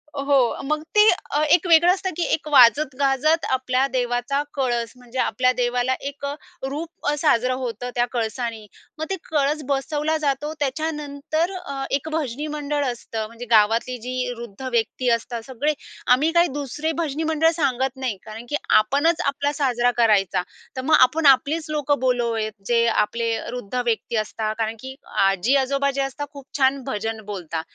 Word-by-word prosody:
हो. 275 -3 +2
मग 305 +1 -1
ते 420 - +7 0.3
अ, 295 - +1
एक 350 +2 +4
वेगळं 340 +2 +6
असतं, 380 -1 -3
की 345 - 0
एक 310 - -1
वाजत 265 +1 +5
गाजत 285 +4 +2
आपल्या 260 0 +1
देवाचा 245 +1 -1
कळस 240 -4 -1
म्हणजे 250 +1 -7
आपल्या 255 0 +2
देवाला 245 +1 +1 0.2
एक 285 0 -8
अ, 280 - -2 0.4
रूप 315 +3 -6
अ, - - +2
साजरं 255 -4 +2
होतं 245 -1 -4
त्या 240 0 +2
कळसानी. 230 -1 -3 0.3
मग 315 - -3
ते 385 - 0
कळस 300 0 +1
बसवला 295 +3 0
जातो. 295 +1 -1
त्याच्यानंतर 300 +3 -2
अ, 355 -6 -7 0.2
एक 285 +3 -1
भजनी 295 -1 -2
मंडळ 290 -1 -1
असतं 225 -3 -4
म्हणजे 230 +2 -9
गावातली 225 +3 +3
जी 250 -1 -2
वृद्ध 235 -1 -10
व्यक्ती 240 +2 0
असतात 235 0 -6
सगळे 275 +4 -1 0.4
आम्ही 305 +5 +1
काही 345 - +5
दुसरे 290 +3 -3
भजनी 310 +1 -3
मंडळ 320 +1 +3
सांगत 265 -1 0
नाही. 255 -7 -3
कारण 220 +2 -9
की 295 - -1 0.3
आपणच 285 +9 +1
आपला 285 +1 0
साजरा 245 -2 +2
करायचा, 195 -6 +3 0.3
तर - - -1
मग 310 +4 +4
आपण 300 +5 +4
आपलीच 305 +5 -4
लोकं 295 -2 0
बोलवावावेत, 235 -4 0
जे 235 -1 +3
आपले 230 +1 +1 0.2
वृद्ध 245 -2 -6
व्यक्ती 230 0 -1
असतात. 215 0 -2
कारण 225 0 -1
की 265 0 -8 0.3
आजी-आजोबा 270 +8 +1
जे 275 0 -2
असतात 280 +2 -5
खूप 280 -2 -11
छान 265 0 +2
भजन 220 -1 -3
बोलता. 175 -6 -4
265 Hz, 165 wpm, -23 LUFS, 235-295 Hz, 0.4 s, ते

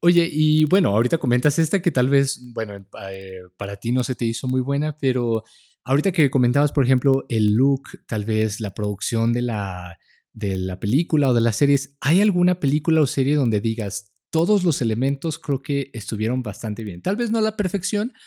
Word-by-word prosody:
Oye, 170 0 +4
y 155 +1 +3
bueno, 185 +5 +3
ahorita 115 +10 +2
comentas 130 +2 +2
esta, 165 +5 +1
que 175 -1 0
tal 125 0 +2
vez, 140 -1 +2
bueno, 110 -3 -6
eh, 100 -1 -13
pa 95 0 -10
eh, 95 -1 -11
para 100 0 -7
ti 115 +4 -4
no 125 - +1
se 125 +1 -4
te - - -4
hizo 115 +3 -3
muy 130 0 +1
buena, 140 +3 -2
pero 120 -5 0 0.4
ahorita 140 +9 +2
que 160 -7 +3
comentabas, 135 +3 +2
por 140 -3 +2
ejemplo, 135 +1 +3
el 105 -3 +2
look, 135 +3 +3 0.3
tal 105 -3 -3
vez 110 -1 -1
la 100 -3 -6
producción 105 +3 -1
de 120 +1 -1
la 95 -7 -5 0.4
de 100 -3 -3
la 95 0 -5
película 145 +5 +1
o 125 - +3
de 115 - +3
las 115 -3 +1
series, 140 0 +2
¿hay 160 +8 +4
alguna 180 -3 +3
película 155 +1 +2
o 145 - +4
serie 135 +3 +1
donde 115 -7 +1
digas: 105 -2 -4 0.2
"Todos 180 +4 +2
los 165 -5 +1
elementos 135 +7 -1
creo 135 -2 -3
que 140 -1 -3
estuvieron 110 +3 -3
bastante 110 0 -7
bien". 90 -4 -9
Tal 195 - 0
vez 240 -1 -2
no 230 - +1
a - - +1
la 215 0 0
perfección, 205 +4 -2
130 Hz, 205 wpm, -21 LUFS, 110-150 Hz, 0.4 s, Oye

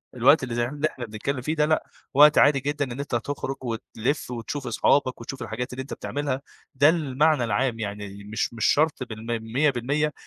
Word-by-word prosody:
الوقت 135 +4 +5
اللي 120 -3 -3
زي 120 0 +1
ما 145 +3 -8
ح - - -8
إحنا 125 - -6
بنتكلِّم 120 +5 -3
فيه 155 +5 -2
ده 150 -1 +3
لأ، 155 +1 +1 0.3
وقت 150 +2 +7
عادي 145 -1 +6
جدًا 145 +1 -1
إن 120 - -6
أنت 140 -3 -2
تخرُج 135 +3 -3
وتلِف 120 +3 -3
وتشوف 125 +4 -5
أصحابك 130 -4 +2
وتشوف 130 +3 -7
الحاجات 120 +2 -4
اللي 130 - -4
أنتَ 130 - -7
بتعملها، 140 -2 -3 0.3
ده 140 +3 +6
المعنى 150 -3 +2
العام 115 +2 0
يعني 100 -1 -6
مش 110 +3 -2
مش 115 -1 -1
شرط 150 -3 +2
بالم 110 -2 -8 0.3
100% 145 +2 +1
130 Hz, 195 wpm, -25 LUFS, 115-145 Hz, 0.3 s, وقت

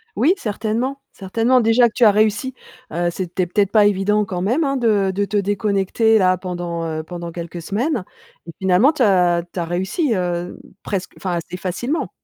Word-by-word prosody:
Oui, 315 +8 +3
certainement, 230 +6 -2
certainement. 230 +6 +1
Déjà 230 +2 +4
que 225 - -8
tu 245 - +1
as 215 - +8
réussi, 215 +5 +1 0.4
heu, 175 +1 0
c'était 180 +1 -2
peut-être 200 +2 0
pas 210 -1 +5
évident 205 +1 +2
quand 180 -2 -4
même, 240 - +1
hein, 275 -1 0
de 210 -6 +2
de 200 +2 0
te 205 +1 -2
déconnecter, 205 +2 +1
là, 185 -2 +3
pendant, 175 -2 -4
heu, 155 -1 -3
pendant 170 +1 -7
quelques 170 0 -7
semaines. 230 - -1 0.4
Mais 165 - -9
finalement, 190 +9 +4
tu 300 -5 0
as 180 -4 +3
tu - - -4
as 170 - -1
réussi, 190 - -1
heu, 175 -1 -3 0.3
presque 190 -2 -4
enfin, 185 -2 -3
assez 170 +1 -4
facilement. 240 - -3
195 Hz, 185 wpm, -20 LUFS, 180-225 Hz, 0.4 s, as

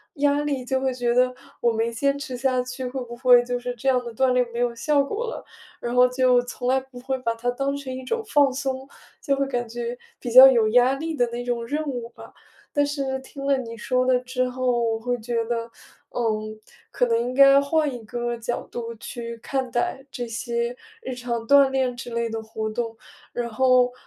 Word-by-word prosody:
压 290 0 +2
力， 280 -4 -2
就 265 +1 0
会 265 0 +1
觉 245 -1 0
得， 250 +1 +3 0.3
我 235 - +3
没 225 +1 -1
坚 275 +4 +1
持 260 -2 -5
下 255 0 +1
去， 255 +1 -6
会 255 +1 -4
不 240 0 -8
会 245 0 +6
就 245 0 -1
是 245 0 -4
这 245 +3 -6
样 255 -2 +3
的 235 -1 -7
锻 260 +2 +2
炼 250 0 +3
没 235 - -4
有 245 -1 +1
效 290 +4 +2
果 425 +12 -3
了。 465 - -6 0.3
然 240 - -4
后 250 0 +6
就 250 -1 +3
从 245 0 -6
来 260 +1 +4
不 260 -1 -13
会 265 +1 -2
把 230 -2 -1
它 240 +2 -2
当 275 +3 -2
成 265 -2 -6
一 260 - -7
种 455 - -2
放 285 -7 +4
松， 265 0 -3 0.4
就 275 - +1
会 275 - +1
感 240 -3 -2
觉 240 +1 -4 0.2
比 245 - -5
较 260 +3 +11
有 235 -5 +4
压 245 +3 +5
力 320 +3 -4
的 245 -4 +2
那 240 +1 -5
种 240 -1 -2
任 300 +5 -2
务 245 -4 -4
吧。 - - -14 0.4
但 290 0 +3
是 275 -2 -2
听 275 +1 -9
了 280 -1 +3
你 230 -2 -7
说 255 +3 0
的 255 -1 +4
之 255 0 -2
后， 250 -1 0
我 225 -1 0
会 245 +2 -1
觉 230 +1 -1
得， 230 0 -3 0.4
嗯， 215 -2 -2 0.3
可 245 - +2
能 230 -1 +2
应 240 +2 -2
该 275 +1 +7
换 300 +1 +1
一 245 - -6
个 240 +2 -3
角 235 +1 -4
度 235 -1 -5
去 235 +1 -7
看 260 -1 -2
待 245 +3 -1
这 245 -1 -4
些 235 +1 -2 0.3
日 260 - -5
常 235 -2 -4
锻 280 0 +6
炼 260 -2 0
之 240 - -7
类 235 0 -1
的 225 0 -4
活 220 0 -4
动。 225 0 -4 0.3
然 240 -1 -3
后， 250 +1 +3
250 Hz, 240 characters per minute, -24 LUFS, 235-265 Hz, 0.4 s, 较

